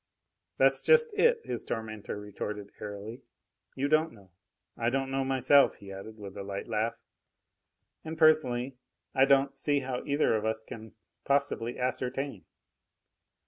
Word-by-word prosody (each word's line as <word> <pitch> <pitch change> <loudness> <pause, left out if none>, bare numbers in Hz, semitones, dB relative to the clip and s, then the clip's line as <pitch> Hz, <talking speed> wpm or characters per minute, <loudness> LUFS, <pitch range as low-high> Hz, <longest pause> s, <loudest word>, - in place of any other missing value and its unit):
"That's - - +4
just 470 -2 +5
it!" 470 +3 +3
his - - -3
tormentor 110 -2 -5
retorted 105 0 -6
airily. 105 +4 -7 0.5
"You 135 +2 0
don't 155 +1 +2
know. 100 -5 -18 0.4
I 115 0 0
don't 135 +1 -1
know 135 0 0
myself," 135 +1 +4
he 100 -1 -11
added, 95 +3 -9
with 100 -2 -9
a - - -4
light 100 0 -5
laugh. 115 0 -1 1.1
"And, 160 0 -6
personally, 135 -5 +3 0.4
I 135 - +5
don't 135 0 +3
see 145 +1 +1
how 130 -1 -4
either 145 -4 +2
of 110 - -1
us 110 0 -1
can 110 0 -10 0.3
possibly 140 -4 0
ascertain. 125 -2 -3
125 Hz, 145 wpm, -29 LUFS, 110-140 Hz, 1.1 s, just